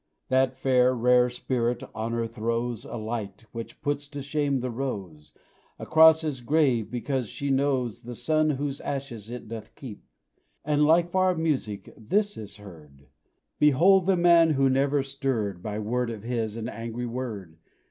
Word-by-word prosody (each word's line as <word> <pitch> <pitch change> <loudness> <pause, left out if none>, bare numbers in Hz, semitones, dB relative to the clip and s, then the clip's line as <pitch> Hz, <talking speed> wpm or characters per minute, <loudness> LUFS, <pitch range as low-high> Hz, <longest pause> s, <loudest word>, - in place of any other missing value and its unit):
That 130 0 +2
fair, 130 -1 +3
rare 125 +1 +4
spirit, 125 -1 -2
Honour, 115 +1 -2
throws 115 +1 -3
A - - -7
light, 110 -2 -5
which 115 -1 -8
puts 145 0 -2
to 145 -1 -7
shame 140 -2 0
the 125 0 -3
rose, 100 - -5 0.5
Across 160 0 +6
his 150 -5 -3
grave, 130 -4 +2
because 125 -1 -2
she 140 -1 -3
knows 135 -4 0
The 120 +1 -8
son 155 +4 +1
whose 140 -1 -2
ashes 125 -6 -5
it 120 -1 -7
doth 110 -1 -8
keep; 120 -7 -10 0.6
And, 150 0 +3
like 170 +3 +3
far 185 0 +2
music, 135 - -2
this 205 - 0
is 105 -2 -9
heard 75 -8 -15 0.5
"Behold 170 +6 +5
the 190 -2 +3
man 170 -1 +6
who 135 -1 +3
never 140 +1 +2
stirred, 130 -9 -2
By 105 +2 -4
word 120 +3 -1
of 110 -3 -7
his, 115 -2 -2
an 115 0 -4
angry 115 0 -5
word! 110 -9 -6
125 Hz, 160 wpm, -26 LUFS, 115-145 Hz, 0.6 s, Across